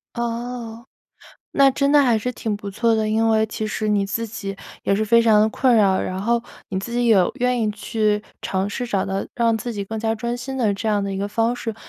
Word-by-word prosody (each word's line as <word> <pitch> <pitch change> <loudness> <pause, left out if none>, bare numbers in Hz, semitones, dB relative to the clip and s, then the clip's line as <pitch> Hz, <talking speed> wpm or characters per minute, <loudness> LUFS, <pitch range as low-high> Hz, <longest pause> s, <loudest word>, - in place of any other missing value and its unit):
哦， 235 0 -4 0.7
那 275 -1 +5
真 280 +1 +1
的 295 0 +6
还 245 -5 +3
是 250 +4 -2
挺 220 -4 -3
不 205 -1 -7
错 230 +3 +1
的， 220 -1 0
因 225 +1 +2
为 220 -1 +3
其 215 0 -4
实 215 0 -2
你 205 -1 +2
自 230 +3 -2
己 200 -3 -6 0.3
也 195 - +2
是 215 +2 0
非 230 +2 +5
常 220 -2 +5
地 215 - +4
困 250 +2 +2
扰， 195 -3 +4
然 185 +1 -3
后 235 +2 +2 0.3
你 190 - -2
自 235 +5 -6
己 240 0 +1
有 195 -5 +4
愿 250 -1 +1
意 215 - +1
去 210 0 -1 0.2
尝 190 +1 -2
试 245 +4 -3
找 195 -4 0
到 195 0 -3
让 230 -2 +2
自 240 +2 -4
己 200 -2 -4
更 220 +2 -5
加 225 0 0
专 235 +2 -3
心 265 +2 -6
的 220 -5 +2
这 210 +3 -3
样 205 -2 0
一 195 - -3
个 200 - -1
方 225 +3 0
式， 225 -2 -4
220 Hz, 255 characters per minute, -22 LUFS, 205-235 Hz, 0.7 s, 的